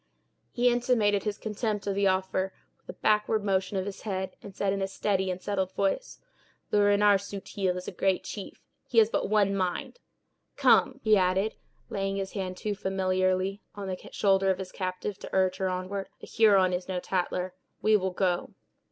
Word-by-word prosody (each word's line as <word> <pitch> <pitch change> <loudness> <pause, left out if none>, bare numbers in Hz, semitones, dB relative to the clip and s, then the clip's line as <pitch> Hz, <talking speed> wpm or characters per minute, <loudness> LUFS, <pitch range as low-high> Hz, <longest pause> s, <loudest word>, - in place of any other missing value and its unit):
He 245 0 +2
intimated 235 -5 +2
his 210 -1 -1
contempt 215 -1 -3
of 200 - 0
the 200 0 +2
offer 190 0 0 0.3
with - - -34
a - - -41
backward 215 0 +2
motion 195 -1 0
of 190 - -1
his 200 -1 -6
head, 190 -3 -3
and 195 - -11
said, 195 -1 0
in 195 - -2
a 195 - 0
steady 190 -1 0
and 180 0 -2
settled 190 -1 -2
voice: 200 - -1 0.5
"Le 210 - +4
Renard 205 0 +5
Subtil 195 -2 -3
is 180 - -7
a - - -3
great 190 -1 +1
chief; 200 - -8 0.2
he 240 - -4
has 225 0 +6
but - - 0
one 205 -2 +3
mind. 185 - -2 0.6
Come," 275 -1 +4
he 215 -1 +5
added, 190 +3 +2 0.4
laying 195 0 -1
his 195 -1 -3
hand 185 -3 -4
too 210 +1 -2
familiarly 190 0 0
on 200 -1 -5
the 185 -1 -6
shoulder 195 -1 +3
of 190 - +2
his 185 -1 -6
captive 185 +1 -4
to - - -8
urge 185 -1 +2
her 190 -1 0
onward; 185 +2 -3
"a - - -5
Huron 200 -5 +4
is 180 0 -3
no 185 -1 -2
tattler; 180 0 -2 0.3
we 215 0 +5
will 190 -2 +1
go." 180 -1 -1
195 Hz, 190 wpm, -28 LUFS, 185-205 Hz, 0.6 s, has